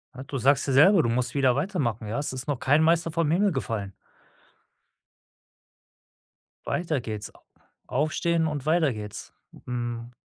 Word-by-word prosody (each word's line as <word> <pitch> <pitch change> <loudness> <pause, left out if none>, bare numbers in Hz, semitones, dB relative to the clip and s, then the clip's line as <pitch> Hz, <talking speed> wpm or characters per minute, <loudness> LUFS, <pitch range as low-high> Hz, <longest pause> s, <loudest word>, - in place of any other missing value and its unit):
Ja, 130 - -7
du 135 0 -5
sagst 140 +3 +3
ja 135 - -1
selber, 170 +6 +6
du 120 - +1
musst 125 +2 -1
wieder 130 -3 +3
weitermachen, 135 - -2
ja? 110 - -3
Es 145 -2 -2
ist 130 +2 -4
noch 145 -4 -1
kein 145 +4 +3
Meister 165 0 +2
vom 165 -1 0
Himmel 195 +5 +3
gefallen. 115 - -3 2.7
Weiter 165 -6 -1
geht's. 110 -3 -5
A - - -21 0.5
aufstehn 160 +4 0
und 145 -3 -4
weiter 155 -3 +2
geht's. 105 -1 -7 0.3
Mhm. 120 -1 -4
135 Hz, 150 wpm, -26 LUFS, 120-160 Hz, 2.7 s, selber